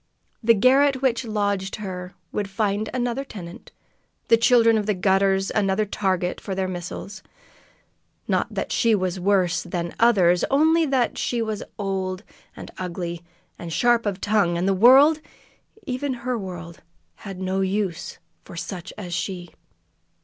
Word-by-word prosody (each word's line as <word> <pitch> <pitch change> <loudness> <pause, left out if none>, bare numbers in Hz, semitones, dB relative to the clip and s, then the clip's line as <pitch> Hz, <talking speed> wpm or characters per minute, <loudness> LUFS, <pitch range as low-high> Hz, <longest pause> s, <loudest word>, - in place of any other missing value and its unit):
The 230 0 +5
garret 265 +4 +4
which 245 -2 +1
lodged 205 -3 -1
her 185 -3 -7 0.2
would 205 -1 -3
find 205 +1 -1
another 245 +1 -2
tenant; 180 -10 -10 0.6
the - - +8
children 230 -1 +4
of 210 - -4
the 210 - +1
gutters 195 +1 +2
another 205 0 +1
target 185 -3 -1
for 195 - -4
their 190 0 -1
missiles. 180 +3 -6 1.1
Not - - 0
that - - -4
she 230 -2 +3
was 185 -1 -2
worse 185 -3 +2
than 175 -1 -4
others 185 -7 +4
only 320 +3 +3
that 260 -4 0
she 240 - -1
was 215 -2 -3 0.2
old 190 -1 -3 0.3
and - - -9
ugly 175 -2 -4 0.4
and 170 -1 -7
sharp 235 +6 +2
of 200 -1 -2
tongue, 200 -5 +1
and 180 +2 0
the 195 - +3
world 270 +10 +6 0.6
even 260 -1 -2
her 255 -1 0
world 175 -5 -7 0.4
has 195 -2 -8
no 190 +1 -2
use 190 -2 -2 0.3
for - - -12
such 180 0 -6
as 180 -4 -6
she. 175 -1 -4
200 Hz, 150 wpm, -23 LUFS, 185-230 Hz, 1.1 s, the